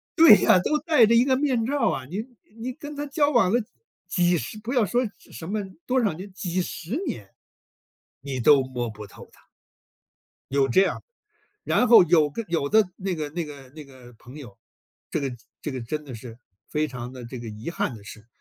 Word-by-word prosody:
对 325 -9 +9
呀， 185 - +5
都 300 +12 +1
戴 300 -6 +4
着 230 - +4
一 235 +2 +5
个 265 -1 +3
面 260 -4 +1
罩 280 +3 +1
啊， 130 - -3
你 185 +10 -4 0.4
你 255 +2 -4
跟 295 +1 -9
他 290 +1 -4
交 290 +1 +1
往 230 -9 +3
了， 240 - +3 0.5
几 175 -1 +2
十 160 - -6
不 230 +3 -6
要 245 -5 +3
说 240 +5 +1
什 160 - -11
么 210 +3 -2 0.3
多 260 +1 +2
少 205 - +1
年 190 +5 -9
几 185 -1 -2
十 180 - -5
年， 100 -4 -6 0.9
你 135 -2 -4
都 135 +4 +6
摸 125 -2 -4
不 105 -1 -9
透 - - -14
他。 - - -22 1.1
有 140 -1 +3
这 185 - +4
样， 195 - 0 0.6
然 250 - +2
后 230 -6 +9
有 160 -3 +3
个 230 +10 -5
有 165 -4 0
的 220 +7 +5
那 190 -1 -3
个 155 -3 -4
那 170 +2 -3
个 140 -3 -11
那 150 +2 -11
个 130 -3 -15
朋 125 +5 -13
友， 120 -5 -11 0.5
这 - - -1
个 135 -3 -3 0.3
这 150 - -4
个 130 - -4
真 150 +6 -4
的 135 -4 -9
是 115 0 -10 0.3
非 155 0 0
常 125 -3 -7
地 125 -2 -9
这 125 +2 -8
个 115 -1 -7
遗 110 +7 -6
憾 150 - -2
的 100 - -14
是， 110 +1 -12
165 Hz, 225 characters per minute, -25 LUFS, -, 1.1 s, 对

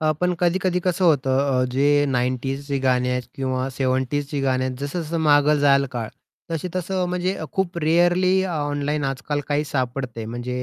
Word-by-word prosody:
अ, 155 -1 +2
पण 180 0 +1
कधी-कधी 180 +1 +1
कसं 180 0 +1
होतं 135 -5 +3 0.2
अ, 125 - +2
जे 145 +2 +3
90s 130 +2 -1
ची 135 - +1
गाणी 125 -1 +2
आहेत 125 0 -1
किंवा 130 -1 -1
70s 130 +2 -1
ची 145 -2 -2
गाणी 130 -1 +1
आहेत 130 -1 -3
जसं-जसं 160 +3 -3
मागे 150 -1 +4
जाईल 140 -1 +4
काळ 115 -3 -3 0.4
तशी 165 +2 -2
तसं 185 0 -1
म्हणजे 180 +1 -1
अ, - - -5
खूप 185 -3 -1
रेअरली 175 +4 +3
अ, 190 - -2
ऑनलाईन 145 0 -1
आजकाल 135 +2 -2
काही 145 +1 +1
सापडते. 130 -4 -3
म्हणजे 125 +2 -4
145 Hz, 180 wpm, -22 LUFS, 130-170 Hz, 0.4 s, मागे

